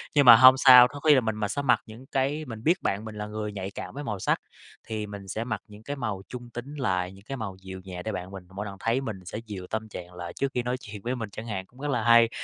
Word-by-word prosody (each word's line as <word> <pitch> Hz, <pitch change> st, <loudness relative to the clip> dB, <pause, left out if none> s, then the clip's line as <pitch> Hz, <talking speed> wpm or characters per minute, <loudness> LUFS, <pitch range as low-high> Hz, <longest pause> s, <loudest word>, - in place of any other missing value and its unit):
nhưng 145 Hz, -2 st, +5 dB
mà 115 Hz, -, +12 dB
hông 130 Hz, +2 st, +9 dB
sao, 125 Hz, -2 st, +9 dB
có 145 Hz, -, -9 dB
khi 150 Hz, -1 st, +5 dB
là 130 Hz, -, +4 dB
mình 110 Hz, -1 st, -1 dB
mà 105 Hz, -1 st, -1 dB
sẽ 140 Hz, +8 st, -2 dB
mặc 125 Hz, -5 st, +3 dB
những 115 Hz, +4 st, -12 dB
cái 140 Hz, +4 st, -1 dB
mình 115 Hz, -2 st, -8 dB
biết 175 Hz, +4 st, +2 dB
bạn 105 Hz, +3 st, -1 dB
mình 110 Hz, -1 st, -7 dB
là 105 Hz, 0 st, -5 dB
người 105 Hz, 0 st, -4 dB
nhạy 95 Hz, -1 st, -5 dB
cảm -, -, -7 dB
với 145 Hz, +1 st, -6 dB
màu 105 Hz, -6 st, -4 dB
sắc, -, -, +1 dB, 0.5 s
thì 110 Hz, -2 st, -3 dB
mình 100 Hz, -1 st, -9 dB
sẽ 110 Hz, +4 st, -3 dB
mặc 110 Hz, -5 st, -3 dB
những 105 Hz, +1 st, -14 dB
cái 145 Hz, +3 st, -4 dB
màu 110 Hz, -7 st, -3 dB
trung 120 Hz, -1 st, -8 dB
tính 125 Hz, +5 st, -7 dB
lại, 90 Hz, -9 st, -1 dB
những 95 Hz, +1 st, -15 dB
cái 135 Hz, +1 st, -5 dB
màu 100 Hz, -4 st, -5 dB
dịu 95 Hz, 0 st, -8 dB
nhẹ 90 Hz, -2 st, -7 dB
để 110 Hz, -, -3 dB
bạn 90 Hz, +1 st, -5 dB
mình 95 Hz, -2 st, -8 dB
mỗi 105 Hz, +1 st, -4 dB
lần 100 Hz, -1 st, -7 dB
thấy 115 Hz, +4 st, +1 dB
mình 95 Hz, -8 st, -6 dB
sẽ 100 Hz, -, -6 dB
dịu 95 Hz, -4 st, -7 dB
tâm 110 Hz, 0 st, -2 dB
trạng 90 Hz, -2 st, -9 dB
lại 85 Hz, -1 st, -7 dB
trước 140 Hz, -1 st, -2 dB
khi 125 Hz, -, -1 dB
nói 125 Hz, +1 st, -1 dB
chuyện 105 Hz, -4 st, -10 dB
với 125 Hz, +4 st, -2 dB
mình 110 Hz, -4 st, -5 dB
chẳng 110 Hz, +4 st, -8 dB
hạn, 95 Hz, -3 st, -4 dB
cũng 125 Hz, +5 st, -22 dB
rất 145 Hz, -, -3 dB
là 115 Hz, -, 0 dB
hay, 115 Hz, -1 st, +6 dB
110 Hz, 305 wpm, -27 LUFS, 100-125 Hz, 0.5 s, mà